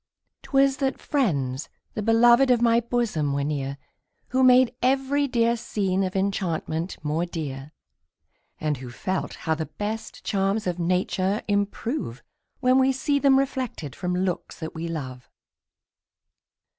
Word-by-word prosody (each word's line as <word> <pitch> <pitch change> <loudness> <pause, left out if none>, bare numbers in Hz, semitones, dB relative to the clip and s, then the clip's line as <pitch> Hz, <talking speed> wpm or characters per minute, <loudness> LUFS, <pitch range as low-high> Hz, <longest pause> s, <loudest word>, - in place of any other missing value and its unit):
'Twas 275 0 +2
that 270 -2 -1
friends, 145 - -1 0.2
the 215 - -3
beloved 235 +4 +5
of 245 -2 +5
my 235 0 +4
bosom, 230 - -1
were 140 0 0
near, 140 -2 -2 0.5
Who 260 +1 +1
made 255 -1 +6
every 270 +2 +2
dear 235 -2 +2
scene 195 -4 -1
of 185 0 -3
enchantment 180 -3 -1
more 155 +3 0
dear, 150 -5 -5 0.9
And 150 -2 -1
who 125 0 -8
felt 185 +10 -3
how 160 - +2
the 160 0 -3
best 215 +2 -5
charms 195 +2 0
of 180 -1 -2
nature 185 +3 0
improve, 205 - -2 0.4
When 255 0 +4
we 265 0 +4
see 280 +2 0
them 275 -1 +5
reflected 260 - -2
from 180 -1 -2
looks 180 -1 -2
that 160 -1 -5
we 165 +1 -4
love. 130 -7 -6
195 Hz, 140 wpm, -25 LUFS, 160-250 Hz, 0.9 s, made